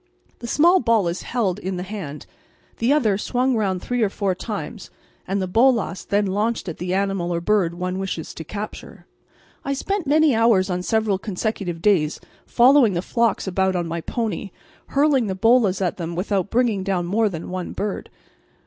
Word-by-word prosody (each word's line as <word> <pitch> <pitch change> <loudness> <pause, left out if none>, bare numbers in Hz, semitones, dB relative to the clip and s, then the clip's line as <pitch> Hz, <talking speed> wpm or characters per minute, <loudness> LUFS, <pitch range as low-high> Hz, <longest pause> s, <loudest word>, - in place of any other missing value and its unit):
The 235 - -7
small 345 +9 +4
ball 230 - +2
is 170 +1 -3
held 210 -6 -1
in 190 -2 -4
the 180 - -3
hand, 185 -7 -7 0.5
the 230 +4 +1
other 220 -10 +2
swung 250 +3 0
round 190 -5 -1
three 245 -1 -1
or 215 - +3
four 195 -1 -1
times 210 +2 -6 0.4
and 195 +2 -1
the 185 - -1
bolas 225 -2 +2
then 205 0 +1
launched 210 +3 -1
at 170 - -6
the 180 +1 -2
animal 195 -3 -1
or 170 - 0
bird 175 -2 +1
one 180 +1 -3
wishes 190 -4 -4
to 160 - -7
capture. 205 +6 -8 0.6
I 275 - -1
spent 365 +4 -2
many 305 0 +4
hours 220 -5 +3
on 180 0 -1
several 215 0 0
consecutive 190 -4 -3
days 165 -7 +2 0.3
following 250 -3 +5
the 175 0 -2
flocks 230 -2 0
about 190 0 0
on 175 -1 -1
my 165 0 -4
pony, 220 0 -3 0.4
hurling 275 -4 +2
the 190 - -2
bolas 210 -2 +3
at 180 - -1
them 170 -1 -4
without 195 +1 -1
bringing 230 -5 +1
down 190 -3 -1
more 210 +4 +1
than 170 -1 -7
one 185 -1 -4
bird. 205 -1 -4
200 Hz, 185 wpm, -22 LUFS, 180-230 Hz, 0.6 s, following